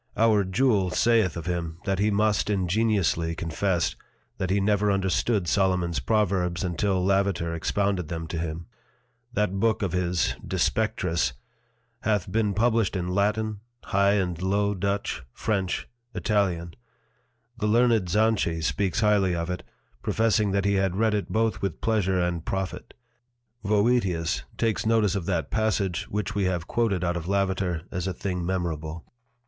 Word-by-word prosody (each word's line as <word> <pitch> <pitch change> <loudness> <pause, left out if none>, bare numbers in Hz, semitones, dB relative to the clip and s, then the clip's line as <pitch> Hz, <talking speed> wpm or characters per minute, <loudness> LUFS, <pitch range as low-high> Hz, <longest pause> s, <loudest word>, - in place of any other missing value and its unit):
Our 110 -2 +4
Juel 100 -1 +2
saith 110 -8 +2
of 85 - -6
him, 85 -2 -3
that 95 -1 0
he 105 +1 +3
must 105 0 +1
ingeniously 95 -4 +1
confess, 85 +1 -1 0.4
that 95 - -1
he 100 +2 +2
never 105 +1 +2
understood 95 +1 +1
Solomon's 90 -3 +1
Proverbs 95 -5 0
until 90 +1 0
Lavater 95 -4 +1
expounded 95 +1 0
them 80 0 -4
to 85 - -3
him: 85 0 -4 0.7
That 100 -3 0
Book 110 0 +1
of 95 - -1
his 90 -1 0
De - - -4
Spectris 90 - 0 0.7
hath 105 -4 0
been 105 -1 +1
published 115 -2 +2
in 90 -1 -2
Latin, 105 +2 0 0.2
High 100 +1 +2
and 90 -4 -1
Low 100 +2 +1
Dutch, 100 -6 -2
French, 95 -4 -1 0.3
Italian. 90 -6 0 0.9
The 105 - 0
learned 115 -4 +3
Zanchy 100 -5 +1
speaks 100 +5 0
highly 100 -4 +3
of 85 +1 -2
it, 90 0 -4 0.4
professing 110 -2 +2
that 100 0 0
he 100 - +3
had 95 -2 +1
read 110 +1 +2
it 105 -1 -1
both 110 0 0
with 95 -4 -2
Pleasure 95 -5 +1
and 90 -2 -1
Profit. 95 -1 -4 0.7
Voetius 100 -6 +1
takes 115 -2 0
notice 110 -4 +2
of 95 -4 -3
that 85 -4 -1
passage 100 -5 0
which 105 0 -2
we 100 -2 0
have 90 -3 -1
quoted 105 -6 0
out 90 0 0
of 85 0 -6
Lavater 95 -4 0
as 90 0 -3
a 95 - -1
thing 90 -2 -3
memorable. 85 -3 -3
95 Hz, 150 wpm, -26 LUFS, 90-105 Hz, 0.9 s, Our